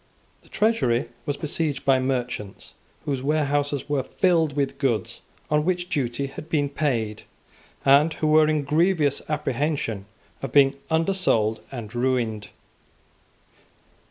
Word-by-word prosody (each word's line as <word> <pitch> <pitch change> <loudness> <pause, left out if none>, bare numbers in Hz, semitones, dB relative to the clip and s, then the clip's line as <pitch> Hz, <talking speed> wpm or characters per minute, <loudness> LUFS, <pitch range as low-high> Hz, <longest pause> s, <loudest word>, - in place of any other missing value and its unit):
The - - -23
Treasury 210 - +1 0.2
was 145 -1 -1
besieged 150 -2 -2
by 135 -1 +4
merchants 125 -6 -3 0.3
whose 135 -3 -2
warehouses 145 -1 0
were 145 -2 0
filled 165 -1 +1
with 140 -1 -1
goods 130 -6 -1 0.3
on 150 0 +3
which 180 +1 -1
duty 130 -1 -1
had 145 +3 -9
been 145 -3 +1
paid, 120 -8 -1 0.6
and 140 +4 +6
who - - -2
were 155 0 +5
in 155 -1 +1
grievous 155 -1 +2
apprehension 140 -7 -1 0.4
of 135 - -4
being 140 0 +5 0.2
undersold 160 - +1
and 115 -5 -7
ruined. 120 -4 -1
140 Hz, 125 wpm, -24 LUFS, 125-155 Hz, 0.6 s, and